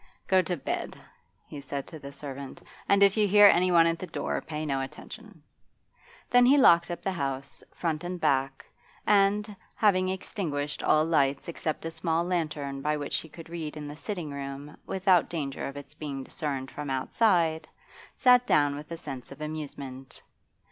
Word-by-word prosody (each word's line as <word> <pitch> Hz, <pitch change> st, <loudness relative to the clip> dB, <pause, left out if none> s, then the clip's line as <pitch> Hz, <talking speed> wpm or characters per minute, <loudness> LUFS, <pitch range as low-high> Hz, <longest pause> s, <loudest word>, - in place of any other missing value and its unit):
'Go 190 Hz, -1 st, +4 dB
to 180 Hz, 0 st, -3 dB
bed,' -, -, -4 dB, 0.5 s
he 145 Hz, -, -9 dB
said 140 Hz, 0 st, -5 dB
to 160 Hz, -, -10 dB
the 140 Hz, 0 st, -9 dB
servant. 140 Hz, -1 st, -8 dB, 0.3 s
'And 200 Hz, 0 st, +5 dB
if 200 Hz, +1 st, +4 dB
you 210 Hz, -1 st, +4 dB
hear 205 Hz, +1 st, +7 dB
anyone 175 Hz, -3 st, +6 dB
at 165 Hz, 0 st, +1 dB
the 185 Hz, -, -6 dB
door, 160 Hz, -, -3 dB
pay 155 Hz, 0 st, -5 dB
no 135 Hz, -2 st, -1 dB
attention.' 135 Hz, -, -10 dB, 0.8 s
Then 245 Hz, 0 st, +5 dB
he 265 Hz, +4 st, +6 dB
locked 170 Hz, -10 st, +6 dB
up 175 Hz, -, -5 dB
the 195 Hz, -, 0 dB
house, 140 Hz, -5 st, -4 dB
front 160 Hz, -2 st, -2 dB
and 180 Hz, 0 st, -4 dB
back, 135 Hz, -3 st, 0 dB, 0.4 s
and, 205 Hz, +1 st, +3 dB, 0.2 s
having 185 Hz, -4 st, +3 dB
extinguished 155 Hz, -6 st, -3 dB
all 155 Hz, 0 st, +3 dB
lights 140 Hz, -4 st, +1 dB
except 160 Hz, -2 st, -4 dB
a 165 Hz, -, -3 dB
small 165 Hz, 0 st, 0 dB
lantern 155 Hz, -6 st, -2 dB
by 150 Hz, +1 st, 0 dB
which 145 Hz, -1 st, -2 dB
he 160 Hz, -, -7 dB
could 165 Hz, +2 st, -11 dB
read 160 Hz, -2 st, -6 dB
in 150 Hz, -1 st, -6 dB
the 145 Hz, -, -7 dB
sitting 170 Hz, -2 st, -5 dB
room 140 Hz, +1 st, -7 dB
without 190 Hz, -3 st, +3 dB
danger 145 Hz, -5 st, -3 dB
of 140 Hz, +1 st, -7 dB
its 145 Hz, 0 st, -10 dB
being 145 Hz, -3 st, -5 dB
discerned 135 Hz, -2 st, -4 dB
from 145 Hz, -1 st, -6 dB
outside, 160 Hz, -, +1 dB, 0.5 s
sat 250 Hz, -1 st, +5 dB
down 145 Hz, -1 st, +3 dB
with 150 Hz, +1 st, -9 dB
a 165 Hz, -, -4 dB
sense 135 Hz, -5 st, -8 dB
of 140 Hz, -, -10 dB
amusement. 140 Hz, -4 st, -7 dB
155 Hz, 175 wpm, -28 LUFS, 140-180 Hz, 0.8 s, hear